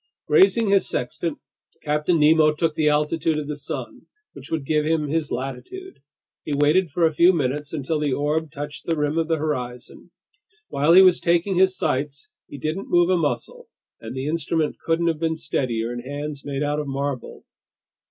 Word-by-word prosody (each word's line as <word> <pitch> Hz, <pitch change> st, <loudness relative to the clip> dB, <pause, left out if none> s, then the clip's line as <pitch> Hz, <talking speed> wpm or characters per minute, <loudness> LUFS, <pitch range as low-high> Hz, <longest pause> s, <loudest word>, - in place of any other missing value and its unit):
Raising 375 Hz, -, +4 dB
his 195 Hz, -1 st, +3 dB
sextant, 145 Hz, +5 st, -3 dB, 0.5 s
Captain 150 Hz, +3 st, +1 dB
Nemo 155 Hz, 0 st, +5 dB
took 160 Hz, 0 st, 0 dB
the 155 Hz, -1 st, +2 dB
altitude 150 Hz, +1 st, +1 dB
of 150 Hz, -1 st, -4 dB
the 150 Hz, -, -3 dB
sun, -, -, -7 dB, 0.3 s
which -, -, -12 dB
would 160 Hz, -4 st, -2 dB
give 150 Hz, +1 st, +1 dB
him 155 Hz, -1 st, 0 dB
his 155 Hz, 0 st, -2 dB
latitude. 135 Hz, -, -6 dB, 0.4 s
He 145 Hz, -, -2 dB
waited 155 Hz, +5 st, +3 dB
for 165 Hz, +4 st, +1 dB
a 160 Hz, -, +2 dB
few 170 Hz, +4 st, +6 dB
minutes 145 Hz, -1 st, -2 dB
until 155 Hz, 0 st, -2 dB
the 150 Hz, -2 st, 0 dB
orb 150 Hz, +3 st, -1 dB
touched 145 Hz, +1 st, -7 dB
the 165 Hz, -1 st, 0 dB
rim 150 Hz, +2 st, 0 dB
of 165 Hz, -, 0 dB
the 165 Hz, -1 st, +1 dB
horizon. 125 Hz, -5 st, -5 dB, 0.6 s
While 150 Hz, +4 st, +3 dB
he 190 Hz, +2 st, +9 dB
was 185 Hz, -2 st, +5 dB
taking 175 Hz, +3 st, +1 dB
his 185 Hz, +1 st, +3 dB
sights, 140 Hz, +2 st, -2 dB, 0.2 s
he 145 Hz, -, -9 dB
didn't 155 Hz, +8 st, -4 dB
move 175 Hz, +1 st, +3 dB
a -, -, +4 dB
muscle, 160 Hz, -4 st, -3 dB, 0.3 s
and 115 Hz, +2 st, -8 dB
the 130 Hz, +1 st, -4 dB
instrument 160 Hz, 0 st, -1 dB
couldn't 165 Hz, +1 st, 0 dB
have 165 Hz, -2 st, 0 dB
been 160 Hz, 0 st, 0 dB
steadier 120 Hz, -6 st, -2 dB
in 120 Hz, -, -5 dB
hands 145 Hz, +3 st, -6 dB
made 140 Hz, 0 st, -3 dB
out 145 Hz, +1 st, -1 dB
of 150 Hz, -, -4 dB
marble. 140 Hz, -1 st, -4 dB
150 Hz, 185 wpm, -23 LUFS, 145-165 Hz, 0.6 s, he